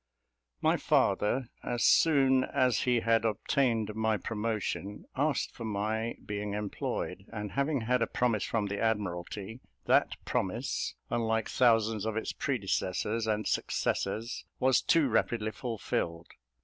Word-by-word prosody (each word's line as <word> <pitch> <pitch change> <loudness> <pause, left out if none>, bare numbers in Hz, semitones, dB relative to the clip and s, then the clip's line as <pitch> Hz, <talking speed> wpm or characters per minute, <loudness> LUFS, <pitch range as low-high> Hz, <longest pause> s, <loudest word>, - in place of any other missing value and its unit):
My - - +4
father, 120 +4 +1
as 120 -1 -1
soon 135 -5 +5
as 125 -3 +1
he 125 -2 +3
had 115 -1 +3
obtained 115 0 +1
my 110 0 +1
promotion, 105 -1 -3
asked 145 +2 0
for 115 - -8
my 110 +2 -2
being 105 -1 -3
employed; 105 -1 -3
and 105 -3 -5
having 140 +4 0
had 125 +2 +1
a - - +2
promise 115 -4 +1
from 110 -3 -1
the 100 0 -3
Admiralty, 105 0 -2 0.3
that - - +3
promise, - - -2 0.2
unlike 110 -1 0
thousands 115 -3 +3
of 110 0 -2
its 110 - -2
predecessors 110 -2 -1
and 105 -1 0
successors, 110 +5 -1 0.2
was 130 0 +4
too 165 -4 +3
rapidly 110 -1 0
fulfilled. 100 -8 -3
110 Hz, 130 wpm, -30 LUFS, 105-120 Hz, 0.3 s, soon